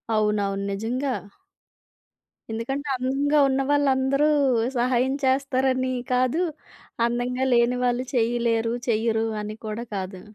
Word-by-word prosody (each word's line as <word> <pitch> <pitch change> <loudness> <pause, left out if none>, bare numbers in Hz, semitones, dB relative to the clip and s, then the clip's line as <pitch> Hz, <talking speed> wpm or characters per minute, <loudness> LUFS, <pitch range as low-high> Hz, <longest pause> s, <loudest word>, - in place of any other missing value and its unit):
అవునవును. 205 -2 0
నిజంగా! 245 +7 -2 1.4
ఎందుకంటే 270 +6 -3
అందంగా 275 +4 +1
ఉన్న 270 0 +1
వాళ్ళందరూ 275 0 +2 0.5
సహాయం 250 +2 +2
చేస్తారని 260 -1 +1 0.2
కాదు, 255 +7 +2 0.6
అందంగా 245 +2 -1
లేని 240 +1 +3
వాళ్ళు 245 +1 0
చేయలేరు 230 -1 +1 0.2
చెయ్యరు 225 0 +1 0.2
అని 210 +1 -5
కూడా 215 +2 -4
కాదు. 190 -1 -5
245 Hz, 100 wpm, -24 LUFS, 225-265 Hz, 1.4 s, లేని